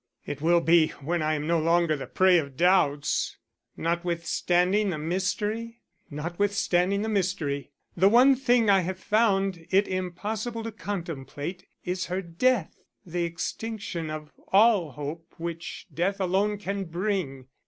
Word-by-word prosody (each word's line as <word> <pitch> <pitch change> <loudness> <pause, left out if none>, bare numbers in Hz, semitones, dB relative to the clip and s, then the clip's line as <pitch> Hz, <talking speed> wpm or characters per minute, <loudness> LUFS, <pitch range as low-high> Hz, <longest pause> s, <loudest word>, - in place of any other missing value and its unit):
"It 145 - -5
will 170 +2 +4
be 165 -1 +5
when 170 +4 -1
I 155 0 +1
am 150 0 -3
no 170 +1 +2
longer 165 0 +2
the 140 - -6
prey 185 -2 +4
of 140 -4 -6
doubts." 150 -5 +2 0.4
"Notwithstanding 175 +3 +1
the 170 - -2
mystery?" 205 +8 -2 0.3
"Notwithstanding 180 +4 0
the - - -2
mystery. 180 -10 -1 0.3
The 190 +3 +5
one 255 +5 +6
thing 245 -3 +2
I 195 -1 +6
have 185 +1 -3
found 195 -4 +1
it 195 +2 +3
impossible 210 +5 -3
to 225 - -4
contemplate 175 -3 -6 0.2
is 180 +1 -2
her 185 +2 -2
death; 190 +4 0 0.3
the 175 0 -2
extinction 170 0 -4
of 155 -1 -6 0.2
all 200 - +4
hope 150 +5 -7
which 170 0 -6
death 185 +6 0
alone 195 +3 +1
can 200 -1 -3
bring. 170 -7 -2
180 Hz, 140 wpm, -27 LUFS, 165-200 Hz, 0.4 s, one